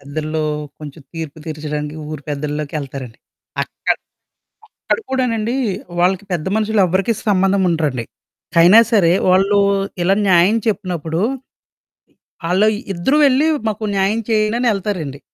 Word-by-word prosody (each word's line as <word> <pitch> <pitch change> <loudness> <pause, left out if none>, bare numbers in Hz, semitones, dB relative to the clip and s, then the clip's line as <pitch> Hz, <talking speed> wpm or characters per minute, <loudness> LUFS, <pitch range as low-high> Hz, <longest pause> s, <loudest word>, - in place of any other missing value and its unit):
పెద్దల్లో 155 +2 -3 0.3
కొంచెం 150 +1 -9
తీర్పు 160 -2 -6
తీర్చడానికి 150 -1 -4
ఊరి 155 -2 -6
పెద్దల్లోకి 150 +1 -4
ఎళ్తారండి. 130 -4 -8 0.4
అక్కడ - - -1 1.0
అక్కడ - - +1
కూడానండి 240 -3 0 0.5
వాళ్ళకి 185 +2 +2
పెద్ద 165 -3 -2
మనుషులు 220 -1 +1
ఎవ్వరికి 190 +5 +1
సంబంధం 195 -1 +2
ఉండరండి. 150 -8 -1 0.6
అయినా 180 +7 +8
సరే 175 -6 +4 0.2
ఆళ్ళు 195 +2 +3 0.4
ఇలా 190 +3 +3
న్యాయం 180 +5 +5
చెప్పినప్పుడు, 175 -6 -2 1.3
ఆళ్ళు 195 +4 +4 0.3
ఇద్దరు 185 +12 +1
వెళ్లి 275 +3 +3 0.2
మాకు 215 0 -3
న్యాయం 195 +4 +1
చేయండని 220 +3 +2
ఎళ్తారండి. 180 -9 -4
180 Hz, 115 wpm, -18 LUFS, 155-210 Hz, 1.3 s, అయినా